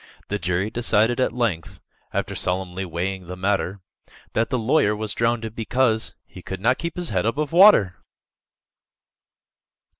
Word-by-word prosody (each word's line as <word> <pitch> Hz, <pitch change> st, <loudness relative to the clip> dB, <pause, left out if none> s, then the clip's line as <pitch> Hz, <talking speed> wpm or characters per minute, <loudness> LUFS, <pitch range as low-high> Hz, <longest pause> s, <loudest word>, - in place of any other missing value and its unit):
The 105 Hz, -, -2 dB
jury 90 Hz, +4 st, -1 dB
decided 115 Hz, +1 st, +1 dB
at 130 Hz, -, +2 dB
length, 95 Hz, -, -2 dB, 0.3 s
After -, -, -2 dB
solemnly 95 Hz, +1 st, -2 dB
weighing 90 Hz, +2 st, -4 dB
the 90 Hz, -, -6 dB
matter, 95 Hz, 0 st, -1 dB, 0.5 s
That 115 Hz, -, 0 dB
the 130 Hz, -, 0 dB
lawyer 115 Hz, -2 st, +2 dB
was 105 Hz, -1 st, -1 dB
drownded, 115 Hz, -1 st, -1 dB
because 115 Hz, 0 st, 0 dB
He 90 Hz, -, -13 dB
could 95 Hz, +1 st, -6 dB
not 115 Hz, +6 st, +2 dB
keep 170 Hz, 0 st, -4 dB
his 175 Hz, -1 st, -4 dB
head 95 Hz, 0 st, 0 dB
above 145 Hz, +5 st, -1 dB
water! 170 Hz, -, +6 dB
110 Hz, 145 wpm, -23 LUFS, 95-120 Hz, 0.5 s, water